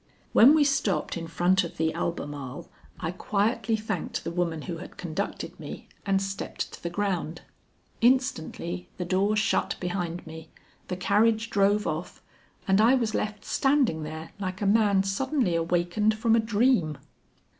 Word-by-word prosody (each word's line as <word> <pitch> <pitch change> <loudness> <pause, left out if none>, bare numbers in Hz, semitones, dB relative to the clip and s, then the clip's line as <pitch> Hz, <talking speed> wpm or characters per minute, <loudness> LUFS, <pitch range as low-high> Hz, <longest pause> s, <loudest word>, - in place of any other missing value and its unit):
When 270 +7 +8
we 310 - +5
stopped 275 -9 0
in 165 -1 -5
front 180 +3 +2
of 170 - -7
the 160 0 +1
Albemarle 145 -5 -4 0.3
I 160 - -2
quietly 215 +5 0
thanked 215 -5 -3
the - - -3
woman 170 -3 -1
who 170 +2 -5
had 170 - -10
conducted 180 +3 -4
me, - - -8 0.2
and 195 -1 +3
stepped 195 0 -4
to - - -10
the 170 - -3
ground. 175 -3 -2 0.6
Instantly 225 - 0
the 180 - -3
door 195 +4 +2
shut 215 +1 +1
behind 175 -1 -3
me, 160 0 -10 0.4
the 180 - -3
carriage 220 +4 +2
drove 205 +1 +3
off, 155 +3 -4 0.4
and 195 +2 +4
I 235 +4 +6
was 230 -4 0
left 210 -1 -3
standing 270 - +2
there 160 +1 -7
like 185 -1 -4
a 205 - -1
man 200 -2 +4
suddenly 240 - 0
awakened 175 +6 +1
from 225 0 +3
a - - +4
dream. 220 - +2
195 Hz, 155 wpm, -27 LUFS, 170-220 Hz, 0.6 s, When